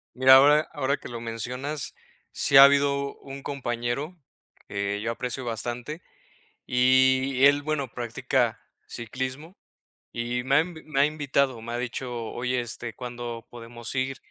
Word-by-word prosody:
Mira, 130 +1 +8
ahora 145 +3 +6
ahora 140 -1 0
que - - -10
lo 120 -1 -6
mencionas, 125 +5 -4 0.4
sí 135 - +3
ha 135 - +12
habido 140 0 +3
un 135 0 -10
compañero 135 +5 -3 0.5
que 100 0 -2
yo 115 +2 -1
aprecio 125 +2 -4
bastante, 120 +7 -4 0.6
y 130 +1 +3
él, 145 0 +5
bueno, 145 -3 -1
practica 120 -2 -1 0.3
ciclismo 130 - -6 0.6
y 120 +1 -2
me 135 +1 +2
ha - - +7
en 170 +3 -2 0.2
me 140 - +1
ha 140 - +6
invitado, 140 -5 0
me 115 - -7
ha - - -2
dicho: 125 +1 -4 0.2
"Oye, 125 +1 -1
este, 120 -1 -6
¿cuándo 120 -2 -7
podemos 120 0 -8
ir?". 130 +1 -1
130 Hz, 145 wpm, -26 LUFS, 120-140 Hz, 0.6 s, ha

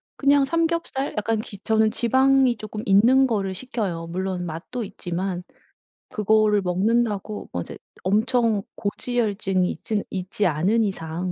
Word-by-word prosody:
그냥 280 0 +4
삼겹살 330 -3 -1
약간 220 +1 0
기 205 -2 -7
저는 220 +1 +2
지방이 260 +1 +3
조금 215 0 -6
있는 240 +7 +5
거를 195 -5 -1
시켜요. 190 -7 -4
물론 185 +1 -3
맛도 175 +9 -5
있지만 180 -1 -4 0.7
그거를 215 -2 +3
먹는다고 205 +3 0
뭐 90 - -2
이제 - - -8 0.3
엄청 220 +1 +2
고지혈증이 200 -4 -1
있진 215 -2 -3
있지 190 +2 -2
않은 185 +8 +2
이상. 180 -2 -3
210 Hz, 285 characters per minute, -23 LUFS, 185-240 Hz, 0.7 s, 있는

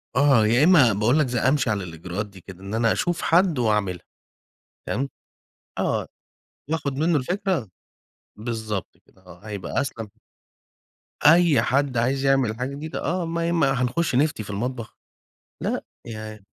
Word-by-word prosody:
آه، 135 -6 +5
يا 120 +6 +4
إمّا 150 - +6
باقول 110 +9 +2
لك 150 - +2
ز 125 - -4
أمشِي 130 +1 +2
على 105 -3 -1
الإجراءات 90 +4 -5
دي 100 -2 -15
كده، 95 0 -12
إن 100 +2 -6
أنا 115 0 +2
أشوف 175 -1 -1
حد 170 -4 +3
وأعملها، 105 -6 0 0.8
تمام؟ 135 +2 -1 0.7
آه، - - 0 0.6
وآخُذ 160 -3 -1
مِنُّه 160 +4 +2
الفكرة، 175 - -2 0.7
بالضبط 110 -3 -4
كده 95 - -26
آه، 90 -1 -14
هيبقى 105 +4 -2
أسلَم. 115 -6 -5 1.2
أي 165 -1 +6
حد 135 -1 0
عايز 135 +4 +1
يعمل 135 -5 +2
حاجة 125 +2 -2
جديدة، 155 +2 -6
آه، 175 +1 -1
ما 165 0 -2
ي - - 0
ما 160 -6 +2
هنخش 130 +4 0
نفْتي 140 -4 +1
في 100 - -11
المطبخ، 115 +3 -4 0.6
لأ، - - -2 0.2
يع 110 -2 -7
125 Hz, 150 wpm, -24 LUFS, 110-150 Hz, 1.2 s, إمّا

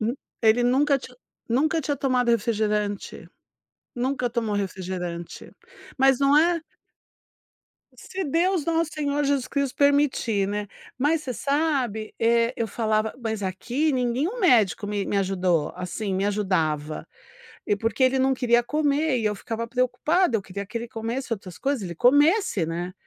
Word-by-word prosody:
Hum 230 +3 0 0.3
ele 225 +2 +4
nunca 275 +3 +3
tinha 250 -1 -12 0.3
nunca 310 +7 +2
tinha 290 0 -2
tomado 250 -3 +1
refrigerante, 210 -2 -1 0.7
nunca 250 0 -1
tomou 225 -3 -1
refrigerante, 180 -3 -5 0.5
mas 270 0 +4
não 280 +1 +5
é 335 +1 +3 1.4
Se 380 -1 -5
Deus, 335 +3 +1
nosso 330 -1 0
senhor, 290 -2 -1
Jesus 275 -2 +1
Cristo 280 -2 -2
permitir, 280 -8 +2
né, 205 0 -3 0.3
mas 305 +4 +1
você 255 - -4
sabe 270 -6 -1
é 230 +1 +3
eu 230 - -1
falava 215 0 -1
mas 220 -2 -3
aqui 245 +11 -1
nenhum 260 - -1
médico 215 - +3
me 205 -1 -2
me 205 - -1
ajudou, 180 -5 +1
assim, 190 +3 -4
me 190 +1 0
ajudava 165 -7 -1 0.6
e 205 - +2
porque 225 +5 -1
ele 260 +1 +3
não 265 0 +3
queria 240 -2 +2
comer 295 -1 +1
e 220 - -2
eu 210 -1 +1
ficava 230 +3 -5
preocupada, 255 +6 +1
eu 205 - 0
queria 200 +1 -6
que 225 - -17
ele 235 +1 -6
comesse 230 +3 -4
outras 185 -5 -9
coisas 270 -6 -1
ele 170 -2 -6
comesse, 285 - +3
né, 175 +2 -4
240 Hz, 150 wpm, -25 LUFS, 205-280 Hz, 1.4 s, não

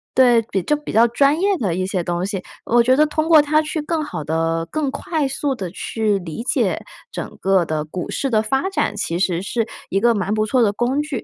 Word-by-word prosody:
对， 245 -3 +5 0.3
就 300 - +3
比 295 - -7
较 230 +2 +5
专 280 +6 +2
业 395 +1 +2
的 185 -7 -1
一 185 0 -1
些 185 -3 -1
东 175 +1 -2
西。 195 -2 -4 0.2
我 240 0 +4
觉 255 +2 +4
得 305 - +5
通 310 +2 -1
过 315 -2 +8
它 305 +1 +2
去 310 0 -3
更 315 0 -2
好 295 - -5
地、 165 +2 -1
更 295 -3 -1
快 305 -1 -2
速 275 0 -2
地 185 -6 -5
去 210 0 -1
理 175 +5 -6
解 - - 0 0.3
整 - - -7
个 190 -2 +3
的 155 -1 -2
股 175 +3 -6
市 270 - -1
的 215 -2 +2
发 270 - -1
展， 385 - -1
其 170 -3 -2
实 175 -1 0
是 225 +3 -1 0.2
一 195 - 0
个 235 0 +4
蛮 205 0 -1
不 215 0 +1
错 250 +3 +2
的 205 -2 +3
工 255 +7 0
具。 295 -5 -4
230 Hz, 250 characters per minute, -20 LUFS, 185-290 Hz, 0.3 s, 过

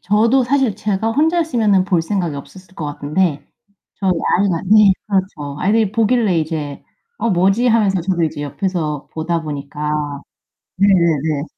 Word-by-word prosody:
저도 225 +7 +3
사실 255 -3 +1
제가 210 +1 -1
혼자였으면은 285 - +2
볼 180 -3 +1
생각이 175 -2 -2
없었을 185 +6 -12
것 155 - -5
같은데 145 +2 -1 0.5
저희 190 -2 +1 0.3
아이가 185 -4 0
네 210 0 +6
그렇죠. 185 -8 -2
아이들이 210 +1 +2
보길래 225 -5 +2
이제 155 -3 -4 0.4
'어, - - 0
뭐지?' 195 +7 +2
하면서 210 -5 +2
저도 175 0 -1
이제 155 -2 -2
옆에서 155 -2 -3
보다 165 +1 -2
보니까 150 0 -4 0.6
네네네 165 -6 +2
185 Hz, 320 characters per minute, -18 LUFS, 155-210 Hz, 0.6 s, 네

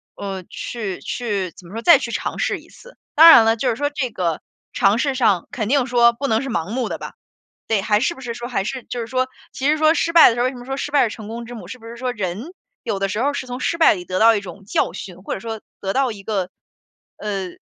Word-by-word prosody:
呃， 195 -2 -5
去 205 -1 -5
去 205 -7 -3
怎 175 - -15
么 190 - -13
说， 230 - -4
再 340 - +7
去 - - -4
尝 - - -3
试 - - 0
一 - - -19
次。 - - -16 0.2
当 325 +2 +10
然 230 - +9
了， 225 0 +4
就 250 +3 0
是 235 - 0
说 290 +4 -1
这 290 -4 -2
个 170 -5 -2 0.3
尝 200 +3 +3
试 275 +1 0
上， 210 -9 +2
肯 215 -4 -3
定 270 0 +2
说 235 -1 +5
不 280 +4 -3
能 225 -1 +1
是 270 - -5
盲 180 -6 -2
目 245 +3 -2
的 - - -3
吧。 - - -8 0.5
对， 220 -3 +1
还 210 +1 +2
是 345 - 0
不 265 - -13
是 240 -2 -4
说 240 0 -6
还 220 -6 -1
是 255 +4 -4
就 245 - -6
是 230 - -4
说， 255 +1 0 0.2
其 270 - -2
实 305 - +3
说 310 +1 +4
失 335 - 0
败 335 - +9
的 230 - -1
时 - - -4
候 245 - +2
为 255 - +1
什 260 - -10
么 245 - -10
说 270 +1 -3
失 290 - -4
败 285 -4 +4
是 - - -7
成 215 -2 -9
功 230 +2 -6
之 245 - -9
母， 185 -6 -9
是 250 +5 -9
不 225 - -12
是 235 - -8
说， 250 0 -2
人 210 - -5 0.3
有 210 -4 -2
的 195 0 0
时 210 - -2
候 285 - +1
是 270 -2 -4
从 250 +1 -5
失 335 - -1
败 320 - +6
里 180 -2 -8
得 185 0 -2
到 225 0 +6
一 205 - -1
种 195 +1 -11
教 - - 0
训， 180 -2 -8
或 - - -4
者 - - -4
说 225 +1 -5 0.2
得 195 -1 -2
到 265 0 +1
一 200 - -9
个， 195 -3 -2 0.7
呃， 200 -3 -3
230 Hz, 310 characters per minute, -21 LUFS, 200-260 Hz, 0.7 s, 当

